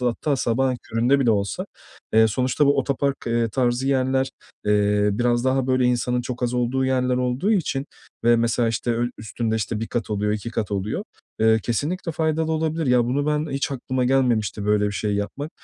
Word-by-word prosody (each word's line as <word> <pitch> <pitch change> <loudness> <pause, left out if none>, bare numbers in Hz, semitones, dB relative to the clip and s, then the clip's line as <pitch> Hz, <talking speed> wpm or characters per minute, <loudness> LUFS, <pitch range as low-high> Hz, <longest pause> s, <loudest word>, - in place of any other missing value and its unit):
hatta 125 +4 0
sabahın 130 +2 +1
köründe 120 +5 +1
bile 120 -3 +3
olsa, 100 -2 -1 0.5
eee, 110 0 +6
sonuçta 130 +6 +1
bu 140 0 +3
otopark, 140 +1 0
eee, 115 0 +1
tarzı 125 +2 0
yerler, 130 0 +1 0.4
eee, 105 0 +3
biraz 120 +2 +1
daha, 130 0 +1
böyle, 130 -1 +2
insanın 125 0 +1
çok 125 0 -6
az 120 0 0
olduğu 125 +2 0
yerler 130 -1 +1
olduğu 125 - 0
için 145 -7 -1 0.4
ve 120 0 +5
mesela, 115 0 +1
işte, 115 +1 -2
öyl 120 +1 0
üstünde, 110 +1 -2
işte, 110 0 -2
1 115 - -2
kat 120 -3 -3
oluyor, 105 0 0
2 105 +2 -4
kat 110 -2 -3
oluyor. 100 +1 -2 0.4
Eee, 110 0 +5
kesinlikle 160 - -2
faydalı 160 0 0
olabilir. 160 -1 -1
Ya, 125 -1 +4
bunu 140 +4 -1
ben 150 0 0
hiç 140 +2 -1
aklıma 130 -1 -2
gelmemişti 120 -6 +1
böyle 105 0 +3
bir 100 - -2
şey 105 +1 -1
yapmak. 130 +9 -4
125 Hz, 190 wpm, -23 LUFS, 115-135 Hz, 0.5 s, eee